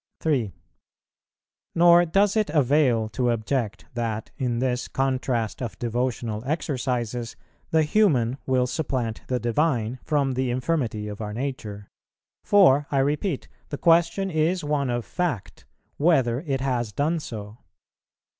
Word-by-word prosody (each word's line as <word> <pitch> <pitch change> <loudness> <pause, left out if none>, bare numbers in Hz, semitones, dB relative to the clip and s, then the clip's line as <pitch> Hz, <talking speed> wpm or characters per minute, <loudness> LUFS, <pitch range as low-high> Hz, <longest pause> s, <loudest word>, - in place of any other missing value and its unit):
3. 130 -10 0 1.2
Nor 175 +1 +6
does 195 +5 +2
it 215 -1 +1
avail 135 -6 +3
to 125 +2 0
object 115 -1 -2
that, 115 -2 -3
in 125 -2 -1
this 125 0 -1
contrast 130 -4 -1
of 115 -8 -5
devotional 120 -2 -2
exercises, 125 -5 -2 0.3
the 160 -1 +3
human 145 - +2
will 130 -1 +2
supplant 125 -5 -2
the 125 -1 0
Divine, 120 0 0
from 145 -3 +1
the 130 0 -1
infirmity 125 -5 -1
of 105 +1 -7
our 105 -1 -4
nature; 110 -5 -5 0.6
for, 145 -9 +5
I 140 - 0
repeat, 145 +8 0 0.2
the 145 - -4
question 170 +4 +3
is 160 +3 +1
one 145 -3 0
of 120 -1 -2
fact, 165 - -3 0.3
whether 135 -7 +3
it 135 -2 -1
has 125 -5 -1
done 155 +9 0
so. 110 -5 -8
130 Hz, 130 wpm, -25 LUFS, 115-150 Hz, 1.2 s, Nor